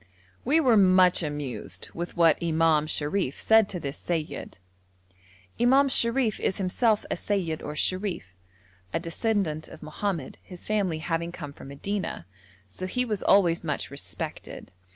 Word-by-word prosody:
We 295 +6 +3
were 250 -8 +4
much 185 -2 +5
amused 130 - -4
with 170 +1 -6
what 165 -2 +4
Imam 160 -2 +2
Sharif 150 -1 -1
said 220 -2 +4
to 180 - -4
this 140 -3 -5
seyyid. 165 -3 -4 1.0
Imam 265 +4 +5
Sharif 235 -2 +2
is 190 - -1
himself 205 +3 +1
a - - +1
seyyid 180 -6 -2
or 150 - -6
sherif, 185 +2 0 0.7
a - - +1
descendant 170 -2 -1
of 160 - -12
Mohammed, 155 -1 -4
his 180 -2 -12
family 200 -6 0
having 165 +1 -2
come 145 -4 -8
from - - -12
Medina, 185 - -4 0.4
so 140 - -6
he 250 +7 0
was 210 -4 -3
always 175 -4 +3
much 150 -4 -3
respected. 140 -9 -6
175 Hz, 145 wpm, -26 LUFS, 155-205 Hz, 1.0 s, much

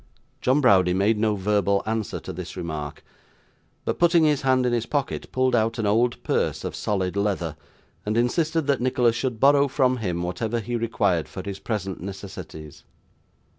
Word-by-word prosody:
John 130 +4 +3
Browdie 95 -8 +4
made 105 +3 +2
no 110 -1 +2
verbal 100 0 +1
answer 110 -1 -2
to - - -7
this - - -7
remark, 80 -4 -5 0.8
but - - -2
putting 170 -1 +5
his 150 -3 +3
hand 130 -1 +2
in 125 - +1
his 120 -1 -1
pocket, 145 -2 -2
pulled 130 -1 +2
out 115 0 +1
an 110 - -1
old 115 +4 +1
purse - - 0
of - - -4
solid 95 -2 -1
leather, 100 -6 -1 0.5
and 105 +2 -1
insisted 155 +6 +1
that 140 -3 +1
Nicholas 125 -2 +2
should 120 -2 -2
borrow 140 +2 +5
from 130 -2 +2
him 90 -6 -2
whatever 110 +7 -2
he 120 +2 -4
required 100 -8 0
for 95 - -7
his 100 -1 -6
present 100 -6 -4
necessities. 95 -5 -8
110 Hz, 170 wpm, -24 LUFS, 95-130 Hz, 0.8 s, putting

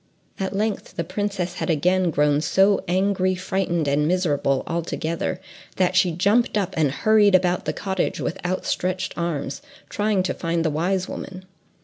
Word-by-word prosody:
At 190 0 -2
length 215 +1 -2
the 170 - -1
princess 185 0 -3
had - - -3
again 180 +3 +2
grown 150 -1 +2
so 195 +5 +3
angry, 185 +1 +1
frightened, 185 -3 -1
and 145 +2 +2
miserable, 150 -6 +1
all 170 0 -1
together, 170 +2 -3 0.4
that 185 0 +1
she 185 -1 +4
jumped 205 +7 +2
up 195 -2 -1
and 155 -3 +2
hurried 210 +5 +4
about 180 -1 +2
the - - 0
cottage 190 -2 -2
with - - -4
outstretched 185 0 -2
arms, 160 -5 -3 0.3
trying 205 -2 +1
to 185 - -1
find 165 0 -1
the 160 - +1
wise 180 +5 0
woman. 185 0 -7
185 Hz, 160 wpm, -23 LUFS, 165-190 Hz, 0.4 s, she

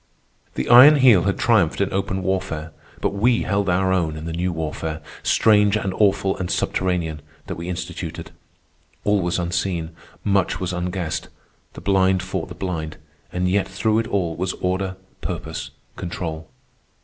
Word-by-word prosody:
The - - -2
Iron 130 +5 +9
Heel 125 - +6
had 100 - +1
triumphed 110 -10 +2
in 100 -1 0
open 95 0 -1
warfare, 85 -4 -2 0.3
but - - 0
we 115 +4 +2
held 100 -1 0
our 95 +1 +2
own 80 -4 0
in 80 - -7
the 85 - -4
new 90 +2 -1
warfare, 80 -1 -4 0.2
strange 105 -2 +4
and 100 -3 -2
awful 95 -1 +2
and 90 -1 -3
subterranean, 85 -5 -1 0.2
that - - -4
we 85 +1 -6
instituted. 90 -2 -5 0.7
All 105 -1 +2
was 90 0 0
unseen, 85 -1 -2 0.3
much 100 -3 +1
was 90 -1 -2
unguessed; 90 -2 -3 0.5
the - - -10
blind 95 -2 +2
fought 95 -3 -4
the - - -8
blind; 80 -5 -4 0.3
and 90 0 0
yet 95 +2 +1
through 110 +3 +1
it 115 - -2
all 90 -6 -1
was 95 +1 -2
order, 95 +1 -2 0.2
purpose, 80 +3 -5 0.3
control. 80 -3 -5
95 Hz, 160 wpm, -22 LUFS, 85-100 Hz, 0.7 s, Iron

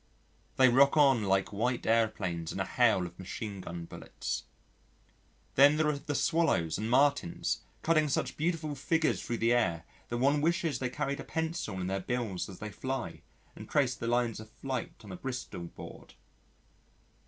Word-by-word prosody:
They 130 - +6
rock 140 +4 +5
on 135 -7 +5
like 95 +1 +1
white 120 +4 -1
aeroplanes 105 -7 0
in - - -5
a 95 - 0
hail 110 -4 +3
of 90 0 -10
machine 100 +1 -6
gun 85 -1 -6
bullets. - - -5 1.1
Then 145 +3 +6
there 155 -1 +3
are 145 -2 -1
the 145 0 -4
Swallows 100 - +1
and 110 +1 -2
Martins 140 -7 +2 0.2
cutting 155 -2 +3
such 140 - -1
beautiful 155 -1 -1
figures 155 +3 +1
thro' 120 - -3
the 115 +1 +3
air 85 -9 +1 0.3
that 120 - -2
one 140 +4 +3
wishes 165 -4 +1
they 125 - -1
carried 140 +2 -2
a - - -5
pencil 160 - -3
in 90 - -2
their 95 +1 -1
bills 110 -3 -3
as 95 - -9
they 105 0 -6
fly 130 +3 -4 0.3
and - - -10
traced 130 -4 +1
the 115 - -3
lines 120 -2 +1
of 110 0 -10
flight 130 +3 -4
on 100 - -10
a 90 - -6
Bristol 125 -9 -5
board. - - -11
120 Hz, 175 wpm, -31 LUFS, 100-140 Hz, 1.1 s, They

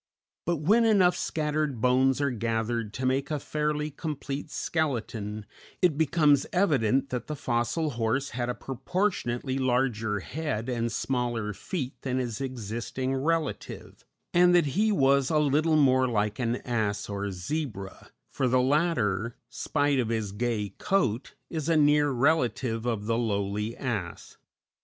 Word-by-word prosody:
But 175 - +2
when 215 +9 +4
enough 195 -5 +4
scattered 150 -4 -1
bones 130 +3 +3
are 140 -2 +1
gathered 115 -1 -1
to 130 - -3
make 130 +2 +1
a 150 - 0
fairly 150 +1 -2
complete 145 -1 -5
skeleton, 115 -11 -2 0.3
it 175 -5 +3
becomes 150 -2 +3
evident 135 - +2
that 125 -2 -3
the 150 - -3
fossil 125 +4 -1
horse 120 +4 -1
had 120 0 -2
a 125 - -1
proportionately 135 - -2
larger 120 -5 0
head 130 - -3
and 115 -1 -1
smaller 120 -3 -1
feet 135 - -5
than 130 -1 -2
his 120 -2 -3
existing 125 +1 -3
relative, 155 +3 -2 0.3
and 180 0 +6
that 175 -3 +5
he 215 +4 +3
was 140 -6 +3
a 155 - +2
little 150 +2 +3
more 130 -3 +4
like 105 -3 0
an 120 -1 0
ass 105 -4 -1
or 100 0 -3
zebra, 100 - -5 0.2
for 130 - 0
the 130 +1 +3
latter, 125 - +1
spite 145 -2 0
of 120 -3 0
his 110 -3 -1
gay 105 -1 -1
coat, 135 - 0 0.2
is 160 -2 -2
a 165 - +4
near 150 0 +4
relative 125 -4 +1
of 110 -4 -1
the 115 +1 +1
lowly 105 0 -1
ass. 110 -10 -4
130 Hz, 145 wpm, -28 LUFS, 115-150 Hz, 0.3 s, and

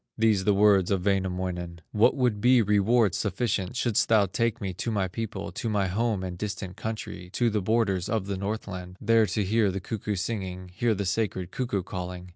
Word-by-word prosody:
These 110 -4 +3
the 105 - +4
words 100 -3 +4
of 95 -2 0
Wainamoinen: 90 -3 -1
"What 105 +6 +4
would 125 -6 +1
be 125 0 +5
reward 105 +1 +3
sufficient, 100 0 -1
Shouldst 120 -2 +1
thou 110 -3 +5
take 115 +5 -1
me 95 -4 -3
to 90 - -4
my 100 -4 0
people, 100 0 -5
To 115 - -3
my 100 -3 +1
home 105 0 0
and 90 -1 -5
distant 100 -3 -4
country, 105 -5 -6
To 120 -2 +2
the 105 -1 0
borders 100 -3 +1
of 110 -3 0
the 100 0 -3
Northland, 95 -2 -5
There 115 0 +4
to 105 - 0
hear 105 +1 +2
the 95 +1 -3
cuckoo 105 +1 -3
singing, 95 -2 -4
Hear 110 +3 +1
the 100 0 -2
sacred 95 -2 -1
cuckoo 120 -7 -2
calling? 90 0 -6
100 Hz, 195 wpm, -27 LUFS, 95-110 Hz, -, be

